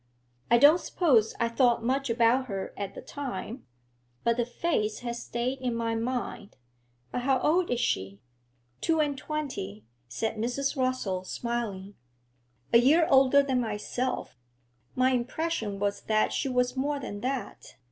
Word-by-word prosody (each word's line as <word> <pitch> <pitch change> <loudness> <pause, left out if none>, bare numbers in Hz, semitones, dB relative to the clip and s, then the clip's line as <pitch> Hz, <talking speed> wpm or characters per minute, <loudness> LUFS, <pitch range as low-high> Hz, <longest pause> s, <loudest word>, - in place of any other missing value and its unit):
I 235 - +6
don't 295 +7 +7
suppose 245 - +2
I 235 - +2
thought 235 0 +2
much 265 +2 0
about 235 +3 +3
her 195 -3 -4
at 200 -1 -5
the - - -8
time, 255 -3 -6 0.6
but 235 0 +2
the 240 0 -1
face 240 -6 -1
has 240 -1 -4
stayed 250 +3 -3
in 250 -2 -2
my 230 0 -1
mind. 230 -2 -3 0.5
But 245 - -2
how 260 +1 +2
old 345 +3 +2
is 245 - 0
she?' 95 - -1 0.6
'Two 325 -1 +2
and 295 -2 +1
twenty,' 260 - -5 0.2
said 220 - -3
Mrs. 250 +6 -1
Rossall, 255 -8 -1
smiling. 215 -5 -4 0.8
'A 235 - +9
year 310 +7 +5
older 270 +1 +6
than 260 -2 +1
myself; 230 - -3 0.6
my 255 +1 +3
impression 245 -3 -2
was 200 0 -1
that 215 0 +1
she 275 - -1
was 250 0 +1
more 285 +2 -1
than 205 -6 -6
that. 260 +1 -4
245 Hz, 150 wpm, -28 LUFS, 225-270 Hz, 0.8 s, A